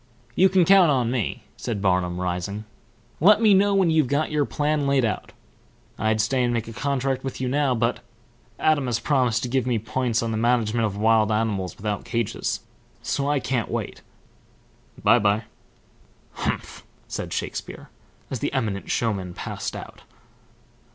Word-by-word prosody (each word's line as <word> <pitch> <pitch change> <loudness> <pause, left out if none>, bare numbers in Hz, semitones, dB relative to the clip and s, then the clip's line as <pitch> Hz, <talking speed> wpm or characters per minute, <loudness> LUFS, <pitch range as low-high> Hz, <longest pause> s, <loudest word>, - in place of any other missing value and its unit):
"You 190 +1 +5
can 185 -2 +4
count 190 -2 +6
on 125 -4 +1
me," 120 -6 -2
said 115 -4 -3
Barnum, 90 -2 +1
rising. 90 +4 -3 0.5
"Let 205 +6 +6
me 220 -3 +5
know 200 +1 +4
when 185 -4 +3
you've 155 -4 +3
got 145 +4 0
your 150 -1 +1
plan 150 0 0
laid 135 -3 +3
out. 105 -3 -3 0.7
I'd 110 0 +1
stay 125 +4 +1
and 120 - +1
make 115 -1 -2
a 115 - -7
contract 135 0 -1
with 135 -2 -5
you 130 - -1
now, 135 0 +1
but 115 +1 0 0.6
Adam 150 -4 +2
has 120 -2 +1
promised 125 -3 +1
to - - -1
give 130 0 0
me 120 -2 +1
points 115 +1 -1
on 115 - -2
the 110 - -1
management 115 -1 +2
of 100 -1 -6
wild 110 0 +3
animals 105 -4 -1
without 105 0 -3
cages, 115 -3 -2 0.4
so 140 0 -1
I 145 -1 +2
can't 125 -3 -2
wait. - - -4 1.0
By - - +6
by." 105 +1 +2 0.9
"Humph!" - - -4 0.2
said - - -5
Shakespeare, - - -5 0.4
as 130 - -2
the - - -2
eminent 110 -7 -2
showman 95 -6 -1
passed - - -5
out. - - -9
120 Hz, 165 wpm, -24 LUFS, 110-140 Hz, 1.0 s, count